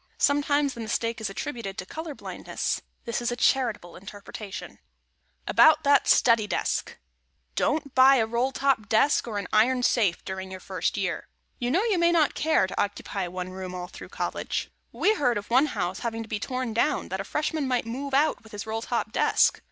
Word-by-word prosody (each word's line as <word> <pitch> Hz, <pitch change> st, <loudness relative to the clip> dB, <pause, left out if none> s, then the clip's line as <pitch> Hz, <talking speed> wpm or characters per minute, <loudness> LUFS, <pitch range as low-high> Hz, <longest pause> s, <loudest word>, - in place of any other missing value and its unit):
Sometimes 285 Hz, -1 st, +2 dB
the 235 Hz, -, -11 dB
mistake 230 Hz, +1 st, -2 dB
is 215 Hz, -, -2 dB
attributed 200 Hz, -2 st, -5 dB
to 180 Hz, -, -5 dB
color 315 Hz, -, -6 dB
blindness. -, -, -4 dB, 0.2 s
This 235 Hz, 0 st, -2 dB
is 240 Hz, 0 st, -1 dB
a -, -, -1 dB
charitable 235 Hz, -8 st, +1 dB
interpretation. 200 Hz, +1 st, -9 dB
[Sidenote: -, -, -38 dB, 0.7 s
ABOUT 315 Hz, 0 st, +6 dB
THAT 285 Hz, -1 st, +4 dB
STUDY 230 Hz, -3 st, +4 dB
DESK] -, -, -2 dB, 0.6 s
Don't 295 Hz, -3 st, 0 dB
buy 265 Hz, +1 st, +7 dB
a 230 Hz, -4 st, +3 dB
roll 235 Hz, +4 st, 0 dB
top 265 Hz, -6 st, 0 dB
desk 240 Hz, +4 st, +3 dB
or 215 Hz, -3 st, -3 dB
an 200 Hz, -, -3 dB
iron 245 Hz, +4 st, +3 dB
safe 210 Hz, -9 st, +2 dB
during 190 Hz, 0 st, -5 dB
your 190 Hz, 0 st, -7 dB
first -, -, -2 dB
year. -, -, -2 dB, 0.3 s
You 245 Hz, -1 st, -1 dB
know, 360 Hz, +11 st, +2 dB
you 425 Hz, -6 st, +1 dB
may 340 Hz, 0 st, +4 dB
not 320 Hz, -4 st, +3 dB
care 315 Hz, -9 st, +2 dB
to 185 Hz, -, -2 dB
occupy 200 Hz, -2 st, -3 dB
one 180 Hz, +1 st, -5 dB
room 185 Hz, -1 st, -7 dB
all 180 Hz, 0 st, -4 dB
through -, -, -11 dB
College. -, -, -3 dB, 0.2 s
We 430 Hz, -, +2 dB
heard 250 Hz, -, +1 dB
of 205 Hz, +2 st, -7 dB
one 265 Hz, +5 st, +5 dB
house 185 Hz, -8 st, -3 dB
having 230 Hz, -1 st, -3 dB
to -, -, -12 dB
be 215 Hz, -, -2 dB
torn 255 Hz, 0 st, -3 dB
down, 230 Hz, -, 0 dB
that 190 Hz, +1 st, -3 dB
a -, -, -4 dB
Freshman 300 Hz, +5 st, -2 dB
might 250 Hz, -3 st, 0 dB
move 265 Hz, +4 st, -3 dB
out 300 Hz, +3 st, +2 dB
with 220 Hz, 0 st, -17 dB
his 205 Hz, +1 st, -5 dB
roll 220 Hz, +1 st, -3 dB
top -, -, -2 dB
desk. -, -, +3 dB
235 Hz, 200 wpm, -26 LUFS, 205-280 Hz, 0.7 s, buy